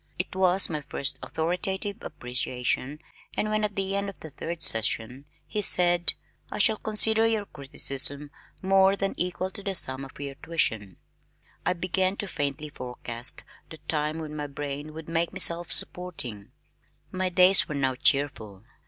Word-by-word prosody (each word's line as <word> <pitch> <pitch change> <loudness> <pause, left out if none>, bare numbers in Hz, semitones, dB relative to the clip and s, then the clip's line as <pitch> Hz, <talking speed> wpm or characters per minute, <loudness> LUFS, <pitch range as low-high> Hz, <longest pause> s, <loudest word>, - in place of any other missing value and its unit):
It 180 - -3
was 190 0 +4
my 155 -2 -3
first 140 -1 -3
authoritative 190 +5 -2
appreciation 125 +2 -3 0.4
and 215 - 0
when 215 0 +1
at 205 -2 -1
the 195 0 -1
end 200 0 -1
of 200 - -11
the 160 - -9
third 165 +3 -5
session 115 +4 -1 0.2
he 210 - -3
said, 175 -2 +5 0.4
"I - - -4
shall 220 -2 +4
consider 220 +1 +4
your 220 -2 0
criticism 140 -1 +2 0.3
more 195 +1 +4
than 195 0 -2
equal 180 +1 -2
to 200 - -10
the 195 -1 -3
sum 130 -5 -2
of 135 - -11
your 140 -1 -5
tuition," 110 - -1 0.7
I - - +3
began 185 +2 -1
to 205 - -2
faintly 145 -2 -3
forecast 125 -2 -5 0.3
the 160 - -10
time 150 0 -1
when 155 -2 -6
my 150 -1 -4
brain 145 +2 -6
would 160 -1 -8
make 165 +1 -1
me 190 - -6
self 170 -1 +3
supporting. 125 - -2 0.6
My 185 0 -1
days 185 +1 +5
were 150 - -3
now 135 -2 +1
cheerful. 125 -7 -1
160 Hz, 160 wpm, -27 LUFS, 140-190 Hz, 0.7 s, said